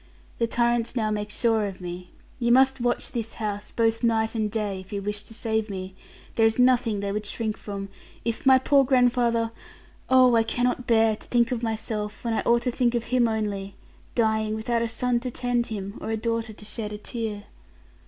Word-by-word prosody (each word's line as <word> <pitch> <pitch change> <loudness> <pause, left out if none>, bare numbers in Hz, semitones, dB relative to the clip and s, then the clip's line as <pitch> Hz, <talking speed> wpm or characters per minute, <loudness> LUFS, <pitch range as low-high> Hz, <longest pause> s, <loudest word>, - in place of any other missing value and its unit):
The 230 - +2
tyrants 235 0 +1
now 215 -3 0
make 210 0 -2
sure 220 -1 +1
of 195 -2 -8
me. 180 0 -7 0.3
You 235 -1 +2
must 265 +1 +5
watch 240 0 0
this 225 -2 -4
house, 205 -2 -4
both 225 -1 +1
night 225 -2 +1
and 215 -2 0
day, 205 -3 -2
if 185 0 -12
you 200 - -2
wish 205 +1 -4
to 225 - -12
save 220 -1 -1
me. 190 -1 -5 0.4
There 225 - +3
is 225 - -1
nothing 250 -4 +3
they 200 0 -2
would 210 0 -3
shrink 220 0 -2
from; 200 -2 -6 0.4
if 230 -1 -2
my 265 -1 +7
poor 275 +1 +4
grandfather 245 -3 +2 0.6
oh, 255 -2 +6
I 225 - +5
cannot 245 +2 -1
bear 225 -1 +4
to - - -15
think 240 -1 +2
of 240 -2 -1
myself, 215 -2 -3
when 230 - 0
I - - +1
ought 235 0 +4
to 250 - 0
think 245 -1 +1
of 235 - 0
him 245 0 +2
only; 205 -3 -2 0.4
dying 220 -2 +1
without 230 +2 -1
a 235 - +1
son 240 +1 0
to 250 +1 -4
tend 245 -1 -1
him, 200 -2 -5
or - - -4
a 225 - 0
daughter 230 0 -2
to 210 0 -13
shed 210 0 -5
a 210 - -5
tear.' 215 -2 -5
225 Hz, 210 wpm, -25 LUFS, 210-240 Hz, 0.6 s, my